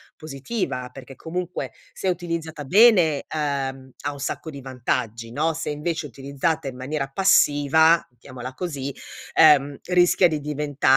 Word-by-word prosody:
positiva? 140 - -4
Perché, 135 -1 -11
comunque, 180 +3 -4 0.2
se - - -5
utilizzata 165 -4 -3
bene, 180 - +5
uhm, 135 -3 -3
ha - - -3
un 140 - -11
sacco 160 - -4
di 140 -3 -8
vantaggi, 120 -3 -3
no? 155 +5 +1
Se, 165 0 -4
invece, 160 +2 -3
è - - -7
utilizzata 140 +4 -2
in 125 - -10
maniera 135 +2 -3
passiva, 160 -3 +4 0.2
mettiamola 130 0 -9
così, 140 -4 -5 0.4
ehm, 145 -2 +5
rischia 180 0 +4
di 155 -2 -2
diventare 150 -1 -5
145 Hz, 140 wpm, -23 LUFS, 135-165 Hz, 0.4 s, bene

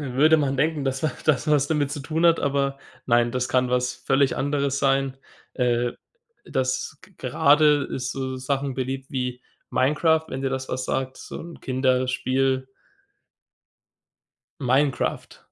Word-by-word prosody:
Würde 145 +3 +4
man 140 -3 0
denken, 150 +1 0
dass 135 0 -2
wa 155 - +1
das 150 -4 +2
was 145 -2 +3
damit 150 -3 0
zu 145 - -4
tun 160 +4 +1
hat. 165 -1 +4
Aber 140 -1 0 0.3
nein, 120 -1 +3
das 125 -1 -1
kann 125 -1 +1
was 125 0 +1
völlig 135 0 +1
anderes 140 0 0
sein. 135 -1 +1 0.4
Äh, 120 -1 +1 0.5
das 130 0 -2
g - - -18
gerade 145 0 +4
ist 125 -1 -4
so 130 -1 -4
Sachen 135 +1 -2
beliebt 135 +2 -4
wie 125 -2 -3 0.3
Minecraft, 155 +4 +2
wenn 130 - -5
dir 135 - 0
das 130 0 -3
was 125 0 -3
sagt, 130 0 -2
so - - -8
'n 170 0 -10
Kinderspiel. 130 0 0 1.9
Minecraft. 135 +1 0
135 Hz, 145 wpm, -24 LUFS, 130-145 Hz, 1.9 s, Würde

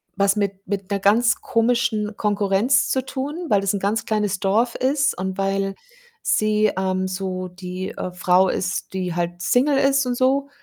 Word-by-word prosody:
was 200 0 +2
mit 200 -1 -3
mit 200 -1 -4
'ner 200 -1 -1
ganz 225 +5 +4
komischen 230 -2 0
Konkurrenz 210 +5 +2
zu 260 -1 0
tun, 290 +6 -4
weil 200 - +3
das 195 +1 0
'n - - -2
ganz 205 +2 -1
kleines 210 -4 -1
Dorf 225 +5 +1
ist, 275 +2 +1
und 190 0 -3
weil 195 0 -1 0.5
sie, 215 -1 +2
ähm, 185 0 0
so 185 -1 -4
die, 180 +1 -6
äh, 180 - -4
Frau 180 +1 +3
ist, 180 0 -3
die 180 -2 -3
halt 175 0 -3
single 255 - +2
ist 275 0 +3
und 250 -1 -1
so. 270 +3 +1
200 Hz, 175 wpm, -22 LUFS, 190-245 Hz, 0.5 s, ganz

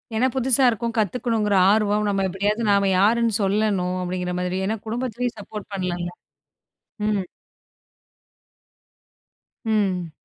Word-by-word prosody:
ஏன்னா, 245 +4 +3
புதுசா 265 0 +3
இருக்கோம். 230 0 -2
கத்துக்கணுங்கிற 220 -1 0 0.2
ஆர்வம், 210 0 +2
நம்ம 195 -1 0
எப்படியாவது 205 +4 -1
நாம 200 -1 +3
யாருன்னு 230 +3 +3
சொல்லணும் 195 -2 +1
அப்படிங்கிற 180 0 -3
மாதிரி. 180 0 -2
ஏன்னா, 220 +3 -1
குடும்பத்துலயும் 240 0 -3
சப்போர்ட் 205 0 -8
பண்ணலாம்ல. 175 -2 -3 1.0
ம். 210 -2 +1 2.4
ம். 190 -6 0
210 Hz, 105 wpm, -23 LUFS, 190-225 Hz, 2.4 s, ஏன்னா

